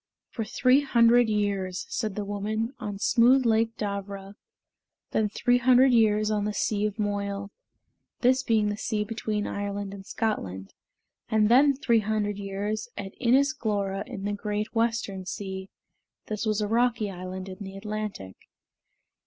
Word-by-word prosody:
"For 225 - -3
three 255 +5 +3
hundred 240 -3 +4
years," 200 -3 -1
said 215 -4 -2
the 210 - -3
woman, 215 +4 -2
"on 210 -4 -5
smooth 245 +5 +4
Lake 225 0 +2
Darvra; 200 -1 -5 0.8
then 215 -1 +1
three 245 +3 +2
hundred 255 +1 +5
years 215 -2 +3
on 210 -1 0
the 210 0 -2
sea 210 -1 0
of 210 - -7
Moyle" 200 -1 -2 0.7
(this 255 +1 +4
being 220 -4 +2
the 205 - -3
sea 215 -1 -1
between 215 -1 -3
Ireland 200 0 -4
and 195 -1 -9
Scotland); 95 - -3 0.6
"and 215 -1 +3
then 275 +4 +6
three 235 -4 +2
hundred 210 -1 -1
years 205 +3 -3
at 195 -1 -6
Inis 270 +4 +4
Glora, 200 -7 -2
in 215 -6 -7
the 205 - -1
Great 210 +1 -3
Western 225 -5 -1
Sea" 190 -1 -5 0.6
(this 215 +1 -3
was 215 0 +1
a 210 - 0
rocky 225 -2 +1
island 185 +1 -6
in 185 +1 -9
the 195 -1 -7
Atlantic). 210 - -5
210 Hz, 155 wpm, -27 LUFS, 200-230 Hz, 0.8 s, then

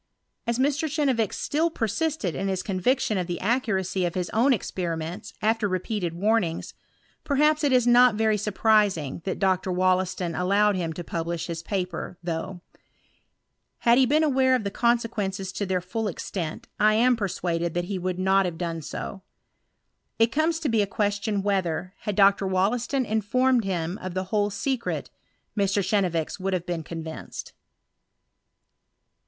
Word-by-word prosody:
As 235 0 +1
Mr. 290 +4 +1
Chenevix 265 - +1
still 320 +3 0
persisted 230 - -1
in 195 - -2
his 190 -1 -1
conviction 210 +2 +1
of 180 - -2
the 175 -1 -3
accuracy 195 -5 0
of 175 -1 -1
his 180 -2 -2
own 240 +5 +3
experiments 180 -2 -3
after 220 0 +2
repeated 185 -2 -2
warnings, 195 -3 0 0.5
perhaps 300 +1 +2
it 285 - +3
is 250 -2 +4
not 245 -1 +6
very 220 0 +2
surprising 205 -7 +1
that 190 - -2
Dr. 190 -1 +1
Wollaston 185 -1 +1
allowed 200 +4 +2
him 170 -3 -2
to 175 - -6
publish 170 0 -3
his 165 -1 -5
paper, 180 -1 -4
though; 175 +2 -4 1.2
had 235 +2 +5
he 260 - +5
been 305 +4 +3
aware 260 -3 +3
of 250 - -1
the 200 - -3
consequences 215 -6 0
to 200 0 -3
their 185 -1 0
full 215 +5 -3
extent, 170 -3 -5
I 215 0 +5
am 245 +3 +4
persuaded 175 -5 -2
that 175 0 0
he 190 0 -3
would 180 0 -2
not 190 +1 +3
have 175 -2 -3
done 165 -1 -3
so. 190 +5 -6 1.0
It 225 0 +3
comes 320 +4 +1
to 310 - 0
be 225 -4 +2
a 200 - 0
question 205 0 -1
whether, 185 -2 -1
had 210 - -3
Dr. 195 0 +4
WollEiston 235 +8 +1
informed 230 +3 +2
him 175 -1 -2
of 185 -1 -6
the 185 - 0
whole 205 -1 +2
secret, 235 +5 -2 0.4
Mr. 200 -2 +1
Chenevix 185 -5 0
would 190 +1 -1
have 180 -2 -1
been 175 -2 -2
convinced. 160 0 -7
200 Hz, 160 wpm, -25 LUFS, 180-230 Hz, 1.2 s, not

